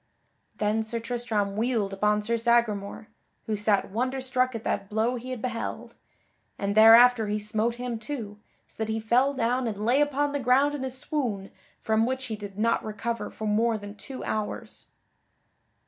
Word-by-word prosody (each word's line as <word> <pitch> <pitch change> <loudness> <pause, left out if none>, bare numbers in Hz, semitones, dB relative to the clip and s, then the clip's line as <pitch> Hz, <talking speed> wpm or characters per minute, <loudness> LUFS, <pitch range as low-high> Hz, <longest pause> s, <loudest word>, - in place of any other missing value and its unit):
Then 215 +1 0
Sir 225 +1 -2
Tristram 225 -4 -2
wheeled 220 -3 0
upon 210 +1 +1
Sir 230 +2 0
Sagramore 225 -3 0 0.4
(who 215 - -1
sat 205 -1 +1
wonder 255 +5 -1
struck 255 -1 0
at 225 - -5
that 195 0 -2
blow 220 +3 +1
he 250 +1 -7
had 255 -4 -5
beheld) 240 -2 -4 0.6
and 200 0 -1
thereafter 225 +1 +7
he 210 +1 0
smote 215 +2 -1
him 245 -2 -4
too, 215 -4 -6 0.3
so 225 - -5
that 220 - -3
he 220 - -1
fell 250 +6 +2
down 245 +1 0
and 215 -3 -3
lay 255 +5 +3
upon 290 0 +1
the 285 - -2
ground 270 +3 +3
in 285 -2 -4
a 265 - -2
swoon 250 -7 -3 0.3
from 220 +1 +2
which 260 0 -2
he 225 - -4
did 205 -2 -9
not 230 +2 +1
recover 220 +2 -4
for 220 - -7
more 220 +2 +2
than 205 -1 -9
two 255 +5 -8
hours. 215 -1 -4
225 Hz, 180 wpm, -27 LUFS, 210-250 Hz, 0.6 s, thereafter